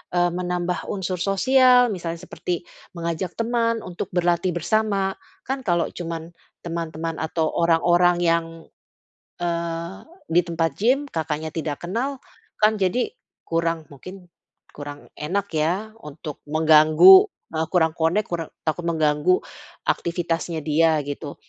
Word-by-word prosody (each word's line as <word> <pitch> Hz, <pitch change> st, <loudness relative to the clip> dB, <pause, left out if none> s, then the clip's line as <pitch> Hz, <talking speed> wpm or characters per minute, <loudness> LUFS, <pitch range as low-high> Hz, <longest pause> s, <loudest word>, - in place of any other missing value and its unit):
eee, 175 Hz, 0 st, +3 dB
menambah 180 Hz, 0 st, -2 dB
unsur 185 Hz, -2 st, -3 dB
sosial, 250 Hz, +5 st, +4 dB
misalnya 170 Hz, -2 st, -4 dB
seperti 180 Hz, -1 st, -4 dB, 0.3 s
mengajak 170 Hz, +1 st, -3 dB
teman 230 Hz, 0 st, 0 dB
untuk 175 Hz, -1 st, -5 dB
berlatih 175 Hz, 0 st, +1 dB
bersama, 195 Hz, +1 st, 0 dB, 0.3 s
kan 265 Hz, +1 st, -3 dB
kalau 175 Hz, -3 st, +1 dB
cuma 165 Hz, -2 st, -5 dB, 0.4 s
teman-teman 165 Hz, -1 st, -4 dB
atau 160 Hz, 0 st, -1 dB
orang-orang 175 Hz, +1 st, +3 dB
yang, 165 Hz, -1 st, +2 dB, 1.0 s
eee, 170 Hz, +1 st, -3 dB, 0.3 s
di 175 Hz, +2 st, +5 dB
tempat 165 Hz, -1 st, 0 dB
gym, 260 Hz, +7 st, +2 dB
Kakaknya 160 Hz, -1 st, -3 dB
tidak 155 Hz, -2 st, -4 dB
kenal, 255 Hz, +9 st, -2 dB, 0.5 s
kan 215 Hz, +1 st, +5 dB
jadi, 200 Hz, -, 0 dB, 0.3 s
kurang, 165 Hz, -1 st, -1 dB
mungkin 180 Hz, +6 st, -11 dB, 0.5 s
kurang 145 Hz, 0 st, -9 dB
enak 190 Hz, +7 st, -2 dB
ya 180 Hz, +8 st, 0 dB
untuk 150 Hz, -4 st, -9 dB
mengganggu, 155 Hz, -, +7 dB, 0.3 s
eee, 160 Hz, 0 st, -1 dB
kurang 160 Hz, -3 st, +3 dB
connect, 170 Hz, +6 st, +1 dB
kure 165 Hz, -2 st, -2 dB, 0.2 s
takut 165 Hz, +2 st, -2 dB
mengganggu 160 Hz, +2 st, +2 dB, 0.5 s
aktivitasnya 170 Hz, -1 st, -1 dB
dia 160 Hz, +1 st, +3 dB
gitu. 145 Hz, +1 st, -6 dB
170 Hz, 120 wpm, -23 LUFS, 160-190 Hz, 1.0 s, mengganggu